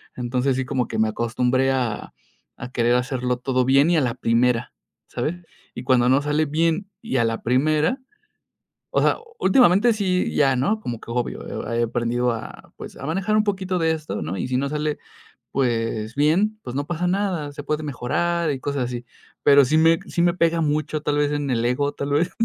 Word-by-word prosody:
Entonces, 125 +2 0
sí, 130 - -1
como 125 -1 -1
que - - -4
me 110 - +3
acostumbré 125 +4 0
a 125 -5 -2 0.4
a 125 - -8
querer 120 -1 +2
hacerlo 125 0 -1
todo 130 0 0
bien 135 +4 +4
y 175 - +3
a - - +3
la 125 -3 0
primera, 120 -1 +1 0.4
¿sabes? 165 +4 -3 0.4
Y 120 - -7
cuando 125 -1 +3
no 130 +3 +4
sale 150 +2 +1
bien, 165 +6 0
y 225 - -2
a 115 - +3
la 115 0 -2
primera. 155 - +1 1.0
O - - +4
sea, - - +3 0.2
últimamente 200 +2 +5
sí, 190 -4 0
ya 135 -3 +3
no, 200 - 0
como 120 - -5
que - - -12
obvio. 120 -2 -4
He 115 +1 -1
he - - +3
aprendido 120 +1 0
a, 115 - -8
pues, - - -9
a 140 - -8
manejar 195 +6 0
un 215 - +4
poquito 190 -3 -1
de 160 0 +2
esto, 155 -1 -4
¿no? 80 +5 -4
Y - - -2
si 125 - -2
no 140 +2 0
sale. 150 0 -2 0.6
Pues, 115 -2 -1
bien, 185 +9 +2
pues, 125 - -6
no 140 - -1
pasa 175 +1 -1
nada. 180 -6 -1
se 145 0 -7
puede 155 +1 -2
mejorar 165 +5 -1
y 140 - -2
cosas 140 -2 -2
así, 120 -1 -5 0.4
pero 140 -1 +7
sí 145 +5 +1
me 165 +1 +4
sí - - -2
me 175 0 +3
pega 170 -2 +2
mucho. 155 0 -1
Tal 145 -1 0
vez 145 0 +2
en 145 -1 -2
el 115 -2 0
ego, 140 +4 0
tal 140 0 -5
vez, 155 +5 +2
140 Hz, 205 wpm, -23 LUFS, 125-165 Hz, 1.0 s, pero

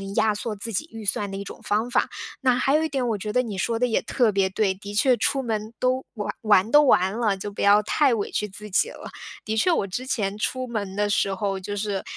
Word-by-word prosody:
压 220 -1 +3
缩 215 +1 -3
自 215 +2 -5
己 310 - -2
预 225 -1 -8
算 200 +1 -1
的 195 - -5
一 200 - -5
种 - - -10
方 215 +4 0
法。 - - +1 0.3
那 255 -2 +3
还 270 +3 +2
有 310 - +3
一 320 - -1
点 265 -4 -1
我 225 -3 0
觉 210 +2 -4
得 250 - +3
你 215 -5 -5
说 230 +4 0
得 250 - +3
也 225 - +1
特 240 -5 +1
别 195 -1 +1
对， 195 0 +1
的 200 +2 -9
确 250 +5 +4
出 270 +3 0
门 220 -1 -3
都 255 +1 0
玩 210 -2 -3
玩 215 -1 +4
都 295 - +8
完 190 -8 +3
了， 215 -5 +1
就 205 +2 -5
不 200 - -6
要 205 +1 +6
太 270 +4 +2
委 210 -3 -2
屈 210 - -1
自 210 +2 -9
己 190 - +2
了。 - - -10 0.4
的 220 - -2
确 290 +12 +3
我 200 -12 +1
之 245 +8 -4
前 205 -6 -2
出 255 +4 -2
门 205 -5 -4
的 205 0 +1
时 200 -1 +1
候， 195 0 -2
就 205 +2 -5
是， 200 -2 -2
215 Hz, 280 characters per minute, -24 LUFS, 200-245 Hz, 0.4 s, 都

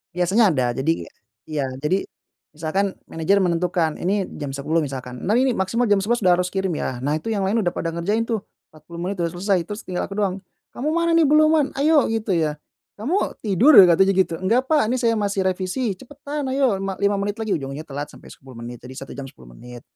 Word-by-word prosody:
Biasanya 190 +3 +3
ada, 130 -4 +1
jadi 160 +5 -1 0.4
iya. 150 -3 -1 0.2
Jadi, 185 +6 0 0.5
misalkan 185 +6 -1 0.2
manajer 195 +5 +1
menentukan, 170 -2 0
ini 195 +1 -1
jam 145 -2 -5
10.00 145 +4 -1
misalkan, 130 -5 -3
"Nah, 205 - +2
ini 255 +1 +2
maksimal 230 +5 0
jam 205 - +5
11.00 230 +5 0
udah 180 -2 +4
harus 180 0 -2
kirim 190 -1 -1
ya." 125 -2 -3
Nah 145 +3 0
itu 225 +8 -3
yang 205 - -1
lain 200 +2 +1
udah 175 - 0
pada 165 - -2
ngerjain 170 +7 -1
tuh, 220 -3 -2 0.2
40 155 +2 -11
menit 190 +3 -3
udah 170 -1 -2
selesai, 180 -1 0
terus 210 +4 -6
tinggal 180 -1 -3
aku 195 - -8
doang. 195 -2 -1 0.3
"Kamu 300 +5 -3
mana 335 0 +2
nih? 330 - +5
Belum 305 +2 +5
man 310 -3 +3
ayo," 300 -2 +4
gitu 225 -1 -3
ya. 150 -2 -1 0.3
"Kamu 295 - -2
tidur?" 220 - +4 0.2
Katanya 190 +3 +4
gitu. 185 -3 +1
"Enggak 235 +8 +1
Pak, 305 -6 +4
ini 245 +3 -1
saya 230 -2 +2
masih 200 -2 0
revisi." 190 +3 -2
"Cepetan, 285 +4 -6
ayo 265 -7 +2
lima 195 0 -3
lima 200 0 +2
menit 205 +2 -3
lagi." 220 -5 0
Ujungnya 135 +1 -6
telat 145 -1 -7
sampai - - -14
10 130 -1 -14
menit, 120 +1 -7
jadi 130 - -9
1 135 -1 -9
jam 140 - -5
10 65 - -14
menit. 125 -1 -11
190 Hz, 215 wpm, -22 LUFS, 160-225 Hz, 0.5 s, jam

